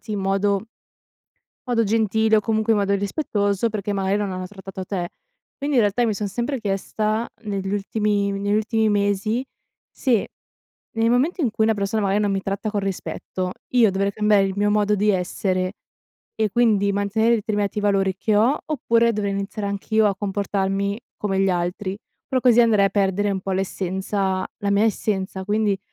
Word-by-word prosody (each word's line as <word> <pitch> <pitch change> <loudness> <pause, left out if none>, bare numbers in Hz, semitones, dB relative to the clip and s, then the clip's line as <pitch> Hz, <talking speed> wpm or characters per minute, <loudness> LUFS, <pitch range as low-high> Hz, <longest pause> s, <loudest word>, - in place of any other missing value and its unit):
in 210 -2 -2
modo 195 +2 +1 1.0
modo 240 -2 +1
gentile 220 0 +2
o - - +2
comunque 220 +1 +1
in 210 - +2
modo 200 0 +1
rispettoso, 205 -1 0
perché 205 -1 -3
magari 195 0 0
non 205 -2 -2
hanno 185 0 -4
trattato 190 -1 -8
te. 180 -3 -3 0.5
Quindi, 285 -2 0
in - - +6
realtà, 205 +4 +1
io 240 - +3
mi 220 - +1
son 205 0 -2
sempre 240 +6 -2
chiesta 215 +2 -1 0.2
negli 195 -2 -3
ultimi 205 0 0
negli 200 +1 0
ultimi 220 0 +1
mesi 205 +4 0 0.5
se, 240 -6 0 0.7
nel 225 +1 +2
momento 275 +9 +1
in 250 -7 +1
cui 220 0 +1
una 225 - +3
persona 200 +2 -1
magari 200 +1 +2
non 205 -1 +1
mi 195 - -1
tratta 195 +2 -3
con 205 -2 -1
rispetto 185 -1 -4 0.2
io 235 -5 +4
dovrei 195 +1 0
cambiare 210 -1 +3
il 195 - -2
mio 205 0 +2
modo 210 0 +2
di 210 +1 +1
essere 185 0 0 0.6
e 220 -1 +1
quindi 210 -3 +3
mantenere 220 +4 +2
determinati 205 -1 -1
valori 195 -2 +1
che 215 +2 0
ho? 235 +7 +4
Oppure 235 -5 +2
dovrei 205 -2 -1
iniziare 200 +1 -3
anch'io 215 +2 +1
a 200 - +1
comportarmi 200 0 -1 0.2
come 195 -2 0
gli 195 - +3
altri? 180 +2 -2 0.3
Però 260 -2 +1
così 240 -2 +5
andrei 215 -4 +4
a 195 - -1
perdere 200 0 +1
un 190 -1 -2
po' 195 - -5
l'essenza 190 0 -1
la 200 - -1
mia 200 +2 +3
essenza, 190 -3 -1
quindi 205 -1 +1
205 Hz, 180 wpm, -22 LUFS, 195-220 Hz, 1.0 s, in